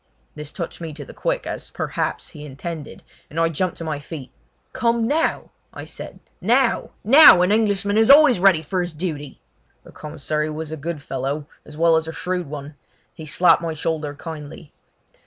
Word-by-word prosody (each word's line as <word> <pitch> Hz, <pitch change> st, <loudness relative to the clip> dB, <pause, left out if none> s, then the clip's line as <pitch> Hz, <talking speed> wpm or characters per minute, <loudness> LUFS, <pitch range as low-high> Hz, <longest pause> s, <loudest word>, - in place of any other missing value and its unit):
This 150 Hz, -1 st, -8 dB
touched 170 Hz, -3 st, -6 dB
me 160 Hz, -2 st, -6 dB
to 145 Hz, -1 st, -8 dB
the -, -, -12 dB
quick, -, -, -2 dB
as, -, -, -6 dB
perhaps, -, -, -3 dB
he 150 Hz, -4 st, -11 dB
intended, 150 Hz, +2 st, -7 dB, 0.3 s
and 160 Hz, -, -4 dB
I 165 Hz, 0 st, +3 dB
jumped 175 Hz, +3 st, -2 dB
to -, -, -6 dB
my 155 Hz, -3 st, -3 dB
feet. 145 Hz, -3 st, -9 dB, 0.4 s
"Come 235 Hz, -1 st, +1 dB
now!" 315 Hz, +5 st, 0 dB, 0.2 s
I -, -, -7 dB
said; -, -, -9 dB, 0.2 s
"now! 240 Hz, +4 st, +2 dB
now! 230 Hz, -, +9 dB
An 180 Hz, -, +2 dB
Englishman 205 Hz, -1 st, +2 dB
is 225 Hz, -, +4 dB
always 280 Hz, -6 st, +7 dB
ready 180 Hz, -4 st, +4 dB
for 180 Hz, +4 st, -1 dB
his 175 Hz, -2 st, -5 dB
duty!" 150 Hz, -5 st, -5 dB, 0.4 s
The -, -, -15 dB
commissary 150 Hz, 0 st, -3 dB
was 155 Hz, 0 st, -6 dB
a -, -, -3 dB
good 155 Hz, 0 st, -5 dB
fellow, 135 Hz, +3 st, -3 dB, 0.2 s
as 150 Hz, -, -11 dB
well 165 Hz, 0 st, +4 dB
as 160 Hz, 0 st, -2 dB
a -, -, -4 dB
shrewd 180 Hz, -1 st, -3 dB
one; 145 Hz, 0 st, -7 dB, 0.4 s
he 155 Hz, -, -10 dB
slapped 170 Hz, +3 st, +4 dB
my 165 Hz, -2 st, -3 dB
shoulder 155 Hz, -1 st, -3 dB
kindly. 150 Hz, 0 st, -9 dB
165 Hz, 185 wpm, -22 LUFS, 150-190 Hz, 0.4 s, now